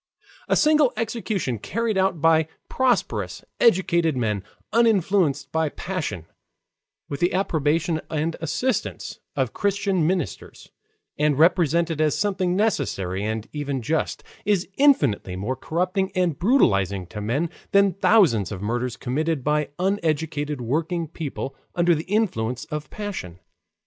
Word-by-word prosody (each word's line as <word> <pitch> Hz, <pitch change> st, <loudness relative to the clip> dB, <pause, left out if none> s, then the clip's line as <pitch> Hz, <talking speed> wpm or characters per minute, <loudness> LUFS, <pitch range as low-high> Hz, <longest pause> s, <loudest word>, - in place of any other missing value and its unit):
A -, -, +3 dB
single 300 Hz, -3 st, +4 dB
execution 215 Hz, -, -2 dB
carried 230 Hz, -, -1 dB
out 190 Hz, -3 st, +1 dB
by 160 Hz, -1 st, +4 dB, 0.2 s
prosperous 140 Hz, -, 0 dB
educated 170 Hz, -, +3 dB
men 105 Hz, -5 st, -1 dB, 0.3 s
uninfluenced 190 Hz, -, +2 dB
by 160 Hz, -1 st, +1 dB
passion, 155 Hz, -, -4 dB, 0.8 s
with 140 Hz, -, -5 dB
the 175 Hz, +1 st, +1 dB
approbation 160 Hz, -2 st, +1 dB
and 160 Hz, +1 st, -1 dB
assistance 250 Hz, +10 st, -2 dB, 0.2 s
of -, -, -1 dB
Christian 200 Hz, -4 st, +1 dB
ministers, 175 Hz, -, -3 dB, 0.5 s
and 150 Hz, -2 st, +2 dB
represented 170 Hz, -1 st, +3 dB
as 155 Hz, -1 st, +2 dB
something 190 Hz, -3 st, 0 dB
necessary 115 Hz, -, 0 dB
and 110 Hz, +1 st, -3 dB
even 140 Hz, -4 st, -3 dB
just, 160 Hz, +6 st, -1 dB, 0.2 s
is 200 Hz, -3 st, +1 dB
infinitely 145 Hz, -, +3 dB
more 105 Hz, +8 st, -2 dB
corrupting 180 Hz, -, -1 dB
and 180 Hz, -5 st, +1 dB
brutalizing 100 Hz, -, +2 dB
to 105 Hz, +4 st, -7 dB
men 140 Hz, +11 st, -1 dB, 0.2 s
than 200 Hz, -1 st, +4 dB
thousands 170 Hz, -, +3 dB
of 100 Hz, -, -5 dB
murders 120 Hz, +4 st, -2 dB
committed 150 Hz, +3 st, -1 dB
by 150 Hz, +1 st, +1 dB
uneducated 155 Hz, -6 st, -1 dB
working 165 Hz, +7 st, -1 dB
people 145 Hz, -3 st, -5 dB, 0.2 s
under 175 Hz, 0 st, +4 dB
the 160 Hz, 0 st, -2 dB
influence 130 Hz, -, -1 dB
of 150 Hz, -1 st, -5 dB
passion. 195 Hz, -, -6 dB
160 Hz, 125 wpm, -24 LUFS, 130-190 Hz, 0.8 s, single